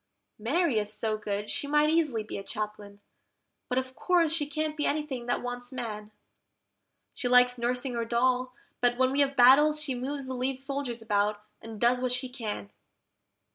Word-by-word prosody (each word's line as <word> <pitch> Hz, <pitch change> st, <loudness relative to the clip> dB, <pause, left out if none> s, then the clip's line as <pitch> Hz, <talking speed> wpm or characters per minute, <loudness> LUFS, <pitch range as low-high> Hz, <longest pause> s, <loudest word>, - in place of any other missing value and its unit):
Mary 275 Hz, +2 st, +1 dB
is 210 Hz, 0 st, -2 dB
so 215 Hz, 0 st, -1 dB
good, 210 Hz, -1 st, -4 dB
she 285 Hz, -, -2 dB
might 300 Hz, +1 st, +3 dB
easily 300 Hz, -9 st, +1 dB
be 210 Hz, -, -6 dB
a -, -, -7 dB
Chaplain, 205 Hz, -1 st, -6 dB, 0.7 s
but 250 Hz, -, -1 dB
of 260 Hz, 0 st, -2 dB
course 340 Hz, -4 st, +2 dB
she 300 Hz, -3 st, 0 dB
can't 310 Hz, 0 st, -2 dB
be 295 Hz, -, 0 dB
anything 285 Hz, -5 st, -2 dB
that 245 Hz, -, -1 dB
wants 245 Hz, 0 st, -5 dB
man; 215 Hz, -5 st, -5 dB, 1.0 s
She 250 Hz, -, -3 dB
likes 250 Hz, 0 st, +5 dB
nursing 245 Hz, +2 st, -1 dB
her 235 Hz, -1 st, -1 dB
doll, 250 Hz, +2 st, +1 dB, 0.3 s
but 245 Hz, 0 st, +2 dB
when 260 Hz, 0 st, +3 dB
we 275 Hz, -, 0 dB
have 280 Hz, -1 st, +2 dB
battles 285 Hz, +4 st, +6 dB
she 295 Hz, -3 st, +1 dB
moves 270 Hz, +3 st, -4 dB
the 260 Hz, -, -5 dB
lead 255 Hz, +1 st, -2 dB
soldiers 270 Hz, -4 st, -4 dB
about, 210 Hz, -1 st, 0 dB, 0.2 s
and 225 Hz, -1 st, -9 dB
does 245 Hz, +2 st, +3 dB
what 255 Hz, -1 st, +1 dB
she 255 Hz, 0 st, -2 dB
can. 215 Hz, -, -5 dB
250 Hz, 180 wpm, -28 LUFS, 225-280 Hz, 1.0 s, battles